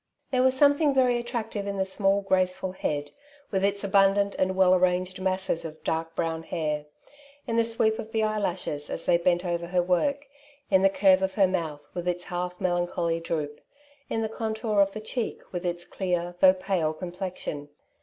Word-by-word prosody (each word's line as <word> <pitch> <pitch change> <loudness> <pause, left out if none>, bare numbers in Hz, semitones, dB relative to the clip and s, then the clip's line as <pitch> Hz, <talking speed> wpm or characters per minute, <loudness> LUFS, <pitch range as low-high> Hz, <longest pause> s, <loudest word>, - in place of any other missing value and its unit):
There 255 -1 +3
was 260 0 +3
something 285 0 +4
very 250 -2 +3
attractive 225 -4 -4
in 200 0 -3
the 190 - +1
small 195 +1 +1
graceful 185 -1 0
head^ 145 -5 -3 0.4
with 190 -1 0
its 200 +1 +1
abundant 200 0 +3
and 185 0 +1
well 185 -1 +5
arranged 185 0 +1
masses 190 -2 0
of 160 -1 -9
dark 165 0 -2
brown 165 -1 -1
hair; 150 -3 -3 0.6
in 230 - -2
the 230 - +4
9weep 225 -1 +1
of 220 - -7
the 220 -1 +1
eye 215 0 0
lashes, 170 -7 -2
as - - -4
they 170 - +4
bent 175 +1 +1
over 170 -1 -2
her 180 0 +1
work; 280 +12 +1 0.5
in 190 -1 +5
the 195 - +5
curve 190 -1 +4
of 190 0 -1
her 200 - +5
mouth, 165 -6 -3
with 175 0 -4
its 180 0 -1
half 180 0 -4
melancholy 175 -2 0
droop; 150 -3 -4 0.5
in 225 - -1
the - - 0
contour 220 -1 0
of 195 0 +3
the 215 - -6
cheek, 225 +2 -3
with 180 0 -3
its 175 0 -3
clear, 175 -2 -2
though 185 0 +7
pale 185 -4 -1
complexion. 175 -4 -6
185 Hz, 190 wpm, -27 LUFS, 175-205 Hz, 0.6 s, though